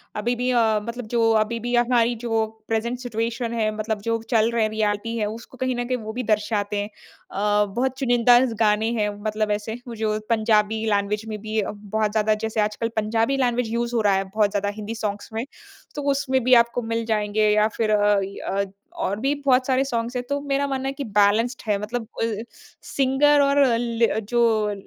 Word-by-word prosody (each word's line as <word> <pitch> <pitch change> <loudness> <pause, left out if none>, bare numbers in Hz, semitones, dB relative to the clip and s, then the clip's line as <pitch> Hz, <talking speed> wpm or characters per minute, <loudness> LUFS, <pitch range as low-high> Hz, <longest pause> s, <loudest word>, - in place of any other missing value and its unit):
अभी 235 +4 -1
भी 250 +1 -1
अ, 225 -3 +3
मतलब 235 +1 -6
जो 230 -1 +3
अभी 230 +2 -5
भी 245 +2 -2
हमारी 240 0 +3
जो 225 -2 +1 0.2
प्रेज़ेन्ट 235 +2 -1
सिचुएशन 230 0 -3
है 220 -2 +1
मतलब 215 -1 -3
जो 230 +1 -1
चल 225 -2 +3
रहे 235 -1 +1
हैं 215 - +1
रियलिटी 215 +1 -1
है 215 - 0
उसको 225 +4 -8
कहीं 255 0 -1
ना 245 - -2
कहीं 255 +1 -1
वो 220 -2 -7
भी 250 +2 -3
दर्शाते 210 -1 0
हैं। 205 - -5 0.4
अ, 210 +1 +2
बहुत 260 +1 0
चुनिंदाज 245 -1 +4
गाने 215 0 +2
हैं 210 0 +1
मतलब 215 -1 -1
ऐसे 210 +1 -2
वो 235 - -6
जो 215 -1 -1
पंजाबी 220 -1 +2
लैंग्वेज 205 +1 0
में 215 -1 -5
भी 220 0 -2
अ, - - -3
बहुत 210 +1 -2
ज़्यादा 215 0 +2
जैसे 220 0 -1
आजकल 210 +2 -1
पंजाबी 225 +4 +1
लैंग्वेज 245 -3 0
यूज़ 235 +1 -1
हो 230 - +2
रहा 205 -2 +3
है 195 - +1
बहुत 205 +2 +1
ज़्यादा 205 0 -1
हिन्दी 215 +1 -6
सॉन्ग्स 205 -2 -4
में। 225 +2 -2 0.5
तो 295 - -3
उसमें 265 -2 0
भी 255 +1 +4
आपको 235 +1 -5
मिल 230 0 -2
जाएँगे 215 -1 +1
या 210 0 +4
फिर 220 -2 +1
अ, 205 -1 +3
इ 195 +1 -7
अ, 200 +1 -1 0.3
और 200 +2 -2
भी 270 +4 +1
बहुत 255 -1 +3
सारे 260 0 +2
सॉन्ग्स 235 -1 -3
हैं। 250 - -1
तो 285 0 0
मेरा 280 0 0
मानना 270 -1 -2
है 270 - -2
कि 280 +1 -5
बैलेन्स्ड 215 +2 +2
है 210 -1 +2
मतलब 225 +2 -4 0.2
अ, - - +3 0.6
सिंगर 280 +2 +3
और 280 0 +4
ले 235 -1 +1
अ, 220 - -1
जो 220 -1 +1
225 Hz, 210 wpm, -23 LUFS, 210-245 Hz, 0.6 s, चुनिंदाज